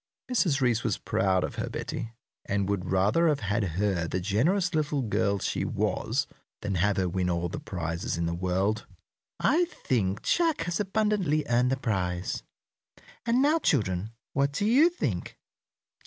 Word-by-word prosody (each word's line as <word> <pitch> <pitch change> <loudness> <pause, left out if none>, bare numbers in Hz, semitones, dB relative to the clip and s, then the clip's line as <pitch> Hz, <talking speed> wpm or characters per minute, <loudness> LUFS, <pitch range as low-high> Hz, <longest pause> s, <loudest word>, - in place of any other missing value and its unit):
Mrs. 170 - +2
Reece 120 -3 +2
was 105 -5 0
proud 95 -1 +1
of - - -4
her - - -2
Betty, 115 0 -5 0.3
and 100 -1 0
would 100 -3 -2
rather 100 - +3
have 150 -3 +1
had 105 +2 0
her 95 -4 0
the 95 - -1
generous 160 - +1
little 150 -3 0
girl 100 -2 +1
she - - -2
was - - 0 0.4
than 105 -1 -2
have 95 +3 +1
her 95 -1 +1
win 90 0 -1
all 85 0 -1
the - - -5
prizes 85 -1 -3
in 85 - 0
the 85 - -1
world. 95 +5 0 0.5
"I 335 +6 +3
think 115 - -1
Jack 330 - +2
has 170 0 -2
abundantly 200 -7 +1
earned 125 +1 +3
the 135 - +1
prize." 90 -7 -2 0.9
"And 240 +3 +3
now, 305 +3 +4
children, 105 - +1 0.2
what 140 0 +2
do 205 - 0
you 270 +10 +6
think?" 350 - -3
110 Hz, 165 wpm, -28 LUFS, -, 0.9 s, you